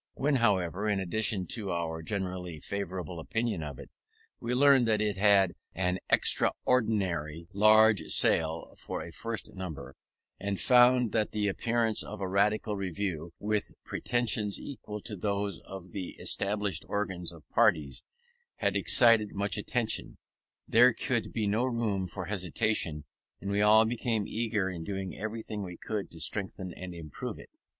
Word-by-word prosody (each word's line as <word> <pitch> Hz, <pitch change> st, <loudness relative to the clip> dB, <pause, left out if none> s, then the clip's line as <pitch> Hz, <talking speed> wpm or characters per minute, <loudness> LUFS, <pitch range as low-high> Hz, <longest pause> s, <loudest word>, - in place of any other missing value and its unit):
When, 140 Hz, 0 st, +1 dB
however, 100 Hz, -3 st, +1 dB
in 100 Hz, -2 st, +1 dB
addition 95 Hz, +1 st, +1 dB
to 105 Hz, -5 st, -2 dB
our 85 Hz, -2 st, -3 dB
generally 90 Hz, -3 st, -4 dB
favourable 90 Hz, -2 st, -5 dB
opinion 115 Hz, +2 st, -2 dB
of 75 Hz, -4 st, -6 dB
it, -, -, -12 dB, 0.5 s
we 120 Hz, +1 st, -2 dB
learned 135 Hz, -2 st, +5 dB
that 110 Hz, -1 st, +3 dB
it 105 Hz, -2 st, 0 dB
had 100 Hz, -3 st, +4 dB, 0.2 s
an 90 Hz, 0 st, 0 dB
extraordinary 90 Hz, -10 st, +1 dB
large 110 Hz, -1 st, +6 dB
sale 80 Hz, 0 st, +3 dB
for -, -, -5 dB
a -, -, -9 dB
first 115 Hz, -3 st, -4 dB
number, 80 Hz, -8 st, -7 dB, 0.4 s
and 100 Hz, -1 st, -3 dB
found 125 Hz, -1 st, +5 dB
that 110 Hz, -2 st, 0 dB
the 105 Hz, -1 st, 0 dB
appearance 115 Hz, +2 st, 0 dB
of 105 Hz, -, -6 dB
a 95 Hz, -, -2 dB
Radical 105 Hz, +2 st, +1 dB
Review, 90 Hz, -3 st, -3 dB
with 105 Hz, 0 st, -2 dB
pretensions 110 Hz, -4 st, 0 dB
equal 105 Hz, -6 st, -7 dB
to 105 Hz, -, -7 dB
those 100 Hz, 0 st, -2 dB
of 95 Hz, -2 st, -9 dB
the 95 Hz, -2 st, -6 dB
established 100 Hz, 0 st, -1 dB
organs 95 Hz, -4 st, -2 dB
of 80 Hz, -3 st, -15 dB
parties, 80 Hz, -, +2 dB, 0.5 s
had -, -, 0 dB
excited 115 Hz, -4 st, +4 dB
much 100 Hz, -1 st, -1 dB
attention, 110 Hz, +2 st, -2 dB, 0.5 s
there 120 Hz, +1 st, +6 dB
could 120 Hz, -2 st, -1 dB
be 110 Hz, -2 st, -1 dB
no 105 Hz, +4 st, +1 dB
room 115 Hz, -7 st, -1 dB
for 90 Hz, +1 st, -6 dB
hesitation, 90 Hz, -4 st, -1 dB, 0.3 s
and 100 Hz, -, -4 dB
we 100 Hz, +1 st, +1 dB
all 110 Hz, +1 st, +6 dB
became 115 Hz, -2 st, -1 dB
eager 110 Hz, -4 st, -1 dB
in 90 Hz, -3 st, -5 dB
doing 95 Hz, +1 st, -5 dB
everything 110 Hz, -1 st, -5 dB
we 90 Hz, -3 st, -7 dB
could 105 Hz, -2 st, -4 dB
to 80 Hz, -, -13 dB
strengthen 95 Hz, 0 st, -3 dB
and 90 Hz, 0 st, -8 dB
improve 80 Hz, -4 st, -7 dB
it. -, -, -14 dB
100 Hz, 150 wpm, -29 LUFS, 90-110 Hz, 0.5 s, large